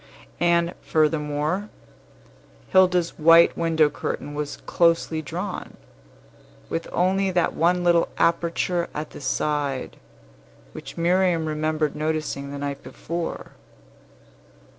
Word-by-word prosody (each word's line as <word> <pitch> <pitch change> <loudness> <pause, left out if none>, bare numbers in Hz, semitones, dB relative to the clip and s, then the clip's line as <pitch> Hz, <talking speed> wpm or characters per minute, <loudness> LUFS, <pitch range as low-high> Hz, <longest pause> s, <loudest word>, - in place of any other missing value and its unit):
And, 170 0 +2
furthermore, 155 +5 0 1.0
Hilda's 180 -3 +3
white 165 +2 +6
window 160 -2 +3
curtain 145 0 -5
was 145 0 -4
closely 165 -2 +2
drawn, 175 +6 -6 0.9
with 165 - -3
only 190 +2 +1
that 180 -2 +1
one 175 +2 +2
little 170 -1 +3
aperture 170 +1 0
at 150 +1 -5
the - - -10
side, 140 0 -2 0.7
which - - -10
Miriam 175 -1 +2
remembered 155 0 -1
noticing 155 -2 -2
the 140 - -6
night 140 0 -4
before. 170 0 -6
165 Hz, 100 wpm, -24 LUFS, 150-175 Hz, 1.0 s, white